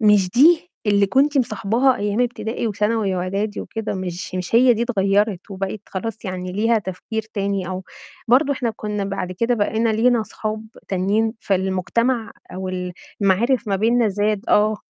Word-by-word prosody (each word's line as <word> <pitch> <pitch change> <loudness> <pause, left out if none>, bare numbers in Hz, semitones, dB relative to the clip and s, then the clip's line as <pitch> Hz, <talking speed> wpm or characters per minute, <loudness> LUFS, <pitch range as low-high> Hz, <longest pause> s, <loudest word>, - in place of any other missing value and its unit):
مش 210 -4 +4
دي 325 - +5 0.2
اللي 200 -1 +4
كنتِ 275 +5 +3
مصاحباها 245 +2 +2
أيام 205 +1 -1
ابتدائي، 240 -1 -2
وثانوي، 210 -2 0
وإعدادي، 195 +4 -2
وكده، 225 -1 -4
مش 185 0 -5
مش 185 +3 -3
هي 245 +1 +6
دي، 225 - -1
اتغيّرت 205 -3 +1
وبقِت 195 +1 -4
خلاص 225 +4 -5
يعني 185 -1 -4
ليها 225 +4 +2
تفكير 210 +3 -5
تاني، 195 -2 -1
أو 185 0 -5 0.4
برضه 275 +4 +4
إحنا 245 -3 -1
كنا 210 -1 -3
بعد 195 -2 -3
كده 230 +6 +1
بقينا 220 +1 +1
لينا 230 +1 +3
صحاب 215 0 -5 0.2
تانيين 200 +4 +1
فالمجتمع، 200 +5 0 0.2
أو 185 0 -4
ال 180 -1 -4 0.3
المعارف 220 +5 +2
ما 195 - +1
بيننا 230 +3 +3
زاد. 205 +1 0
آه. 215 +1 +3
210 Hz, 155 wpm, -21 LUFS, 190-230 Hz, 0.4 s, هي